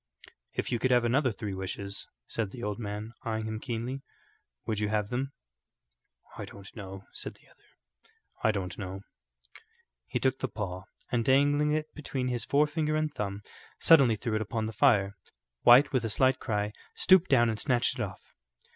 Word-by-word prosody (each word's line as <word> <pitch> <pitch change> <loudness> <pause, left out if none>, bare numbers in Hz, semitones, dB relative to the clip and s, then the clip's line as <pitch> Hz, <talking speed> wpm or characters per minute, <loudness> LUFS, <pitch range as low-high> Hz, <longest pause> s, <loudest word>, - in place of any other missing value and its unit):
"If - - -2
you 120 - +1
could 130 - +1
have 120 -1 +4
another 130 +2 +2
three 105 -1 -5
wishes," 95 +1 -4 0.2
said 110 -4 -2
the 120 +4 -9
old 105 0 -2
man, 105 +1 -5
eyeing 110 -1 -2
him 110 0 -3
keenly, 125 +2 -4 0.6
"would 110 -2 -1
you 105 -1 0
have 105 -1 0
them?" 135 +3 -2 1.1
"I - - -4
don't 100 -1 -12
know," 95 -3 -8
said - - -6
the - - -24
other. 60 0 -29 0.3
"I - - +5
don't 95 -4 -2
know." 95 -1 -5 1.1
He - - -1
took 130 0 +1
the 130 - -1
paw, 95 -4 -5 0.3
and 120 -2 +2
dangling 145 +3 +3
it 155 0 -2
between 135 -4 -3
his 120 -1 -1
forefinger 150 +1 +2
and 155 -1 0
thumb, 100 0 -4 0.4
suddenly 135 -9 +6
threw 110 +2 -3
it 110 - +1
upon 110 +1 -2
the 110 - -4
fire. 100 -5 +3 0.5
White, 125 +5 +7
with 130 -2 +2
a 115 - -1
slight 130 +4 +3
cry, 105 -2 -1 0.2
stooped 185 -1 +5
down 120 -4 +5
and 110 - -4
snatched 130 -1 +1
it - - 0
off. 95 -5 -5
115 Hz, 180 wpm, -29 LUFS, 105-130 Hz, 1.1 s, White